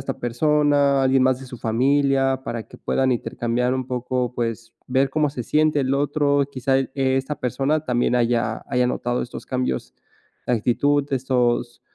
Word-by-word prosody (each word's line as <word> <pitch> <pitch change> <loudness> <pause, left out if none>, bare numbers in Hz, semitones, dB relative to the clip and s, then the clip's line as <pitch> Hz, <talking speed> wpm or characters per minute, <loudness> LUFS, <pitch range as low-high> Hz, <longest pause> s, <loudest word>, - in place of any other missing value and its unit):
esta 135 0 -5
persona, 145 +2 +2
alguien 130 0 +3
más 130 0 +2
de 135 - -10
su 125 - -9
familia, 135 +3 +1
para 115 -1 -4
que - - -14
puedan 130 -1 +1
intercambiar 120 +1 -1
un 130 -1 -3
poco, 125 0 -2
pues, 115 -1 -4
ver 135 +1 +2
cómo 150 0 +1
se 125 -4 -6
siente 155 +2 +2
el 135 0 0
otro, 145 0 +1
quizá 135 0 +1
e 135 - -4 0.3
esta 135 +3 -2
persona 140 +5 -1
también 125 -2 +1
haya 120 -1 0
haya 125 -1 +1
notado 120 0 -1
estos 120 - -8
cambios 125 - -3 0.5
de - - +2
actitud, 140 +5 +1
estos, 120 -2 0
130 Hz, 165 wpm, -22 LUFS, 120-140 Hz, 0.5 s, alguien